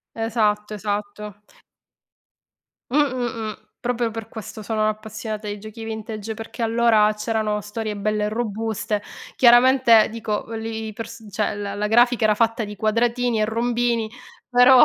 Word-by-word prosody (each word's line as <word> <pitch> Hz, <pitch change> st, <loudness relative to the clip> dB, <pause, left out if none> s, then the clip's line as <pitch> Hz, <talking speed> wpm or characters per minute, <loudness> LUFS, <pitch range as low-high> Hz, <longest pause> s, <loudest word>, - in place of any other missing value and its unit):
Esatto, 215 Hz, -2 st, 0 dB
esatto. 210 Hz, 0 st, -4 dB, 1.5 s
Mh, 265 Hz, -, -2 dB
mh, 255 Hz, -4 st, +2 dB, 0.3 s
mh. 210 Hz, -, -7 dB, 0.2 s
Proprio 240 Hz, -2 st, 0 dB
per 225 Hz, 0 st, -7 dB
questo 220 Hz, -1 st, -8 dB
sono 215 Hz, 0 st, 0 dB
appassionata 215 Hz, 0 st, -4 dB
di 205 Hz, 0 st, -4 dB
giochi 215 Hz, +2 st, -9 dB
vintage, 220 Hz, -1 st, -5 dB
perché 225 Hz, +2 st, -8 dB
allora 225 Hz, -2 st, +4 dB
c'erano 210 Hz, -1 st, -1 dB
storie 210 Hz, +1 st, -4 dB
belle 210 Hz, +1 st, 0 dB
e -, -, 0 dB
robuste. 220 Hz, -1 st, -2 dB, 0.3 s
Chiaramente 240 Hz, -2 st, +6 dB
dico 220 Hz, -2 st, -3 dB
v -, -, -11 dB
li 220 Hz, -1 st, -4 dB
pers 225 Hz, +1 st, -8 dB
cioè 205 Hz, +1 st, -1 dB
la 205 Hz, -1 st, -4 dB
la 210 Hz, +1 st, -1 dB
grafica 240 Hz, +1 st, +4 dB
era 215 Hz, -1 st, +5 dB
fatta 225 Hz, 0 st, +1 dB
di 210 Hz, 0 st, -6 dB
quadratini 235 Hz, +2 st, +1 dB
e 215 Hz, -, +3 dB
rombini, 235 Hz, 0 st, 0 dB, 0.4 s
però. 250 Hz, +1 st, +7 dB
220 Hz, 145 wpm, -23 LUFS, 210-235 Hz, 1.5 s, però